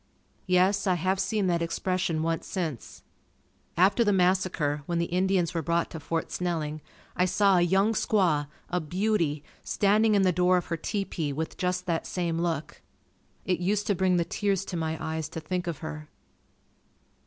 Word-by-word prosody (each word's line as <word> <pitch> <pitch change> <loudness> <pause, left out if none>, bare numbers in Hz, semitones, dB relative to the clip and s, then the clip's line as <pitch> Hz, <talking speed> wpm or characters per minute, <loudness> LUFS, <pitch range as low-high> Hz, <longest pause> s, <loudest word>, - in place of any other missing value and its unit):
Yes, 190 +3 +3
I 185 - +3
have 185 +3 0
seen 200 +1 0
that 170 -2 +1
expression 170 -1 -1
once 165 0 -2
since. 160 - -5 0.7
After 195 +6 +4
the 205 - +2
massacre 180 -6 +1
when 170 - -1
the 170 - +1
Indians 180 -1 +1
were 165 - -1
brought 170 +2 0
to 160 - -6
Fort 165 +2 -3
Snelling 155 -4 -2 0.3
I 180 - +3
saw 190 +1 +3
a - - +4
young 190 +5 +3
squaw, 175 -10 +2 0.2
a 180 - +1
beauty, 170 -3 0 0.2
standing 210 +1 +3
in 200 - +4
the 185 - +4
door 180 +1 +3
of 180 - -2
her 165 - -1
tepee 170 -5 -3
with 160 +3 -4
just 180 0 -1
that 170 -3 -1
same 170 -2 -2
look. 165 -3 -3 0.6
It 180 -2 0
used 205 +3 0
to 205 - +2
bring 185 0 +2
the 170 - +1
tears 195 +1 -1
to 180 - -5
my 160 -1 -2
eyes 160 -1 -3
to 165 - -6
think 175 +3 -3
of 165 -4 -2
her. 155 -1 -7
180 Hz, 175 wpm, -27 LUFS, 165-190 Hz, 0.7 s, After